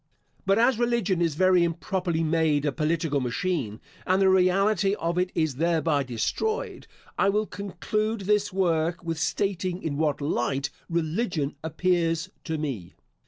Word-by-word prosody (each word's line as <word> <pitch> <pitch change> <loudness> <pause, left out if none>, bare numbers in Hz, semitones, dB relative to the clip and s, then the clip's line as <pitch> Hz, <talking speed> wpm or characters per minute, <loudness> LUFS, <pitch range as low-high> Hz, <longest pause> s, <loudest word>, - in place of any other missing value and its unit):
But 195 +1 +4
as 235 0 +3
religion 235 -7 +1
is 165 -4 +1
very 185 +1 +4
improperly 170 0 -1
made 155 -2 +2
a 145 - +2
political 155 0 0
machine, 125 - -2 0.3
and 185 +1 +3
the 190 -1 +5
reality 195 +2 +3
of 170 -1 -1
it 180 0 0
is 155 -5 0
thereby 160 -2 +1
destroyed, 435 - -2 0.3
I - - +4
will 210 +2 +1
conclude 215 +3 -3
this 205 +1 +1
work 170 -2 0
with 165 -2 -3
stating 185 +1 -1
in 145 -3 -2
what 150 -2 +1
light 135 -1 -1 0.2
religion 165 -2 -1
appears 165 +1 0
to 160 -2 -2
me. 130 - -5
170 Hz, 145 wpm, -26 LUFS, 155-195 Hz, 0.3 s, the